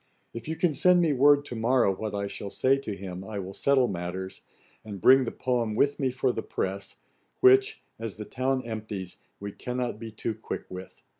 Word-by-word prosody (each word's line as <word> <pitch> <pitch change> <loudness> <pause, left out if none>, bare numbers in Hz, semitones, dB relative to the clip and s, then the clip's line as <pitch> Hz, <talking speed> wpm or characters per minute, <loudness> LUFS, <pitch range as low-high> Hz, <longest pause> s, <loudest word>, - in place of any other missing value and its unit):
If 115 - -7
you 160 - -2
can 170 -1 +1
send 180 +6 +5
me 165 -4 +3
word 145 +2 +5
to 125 - -6
morrow 115 -3 +2
what 105 +1 -4
I 100 0 -1
shall 100 0 -5
say 130 +6 +3
to 110 -7 -5
him, 95 -1 -7
I 105 +1 -6
will 95 0 -5
settle 135 +2 +3
matters, 95 0 -5 0.4
and 105 -3 -7
bring 130 +6 +6
the - - -3
poem 120 -4 -1
with 140 +5 +2
me 135 -2 +1
for 130 0 0
the - - -3
press, 95 +1 -4 0.4
which, 395 +3 +5 0.2
as 115 -3 -4
the 105 - -7
town 130 +2 -1
empties, 105 -5 -6 0.2
we 100 0 -5
cannot 125 0 -4
be 115 0 -6
too 110 +1 -3
quick 110 - -6
with. 95 0 -10
115 Hz, 205 wpm, -27 LUFS, 100-135 Hz, 0.4 s, bring